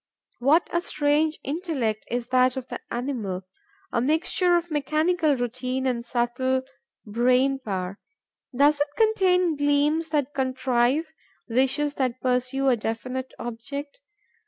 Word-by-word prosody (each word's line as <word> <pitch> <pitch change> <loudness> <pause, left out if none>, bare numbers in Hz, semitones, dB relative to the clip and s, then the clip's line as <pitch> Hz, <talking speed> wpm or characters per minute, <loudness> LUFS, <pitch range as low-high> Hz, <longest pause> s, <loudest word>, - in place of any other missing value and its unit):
What 290 +7 +4
a 345 - +2
strange 305 0 +1
intellect 275 - -2
is 240 0 -3
that 255 0 +3
of 260 -1 -6
the - - -5
animal, 230 -8 -3 0.5
a 235 - +1
mixture 345 +5 +2
of 345 0 -4
mechanical 310 +2 +1
routine 255 +2 -2
and 245 -2 0
subtle 250 +2 0 0.4
brain 250 +5 +2
power! 195 -5 -4 0.5
Does 285 +3 +3
it 290 - +2
contain 370 -6 +3
gleams 290 +3 +2
that 290 -2 0
contrive, 260 +3 +1 0.3
wishes 265 +5 +1
that 255 -1 0
pursue 255 +2 0
a 250 - +4
definite 250 +4 -4
object? 280 - -6
265 Hz, 125 wpm, -25 LUFS, 245-300 Hz, 0.5 s, What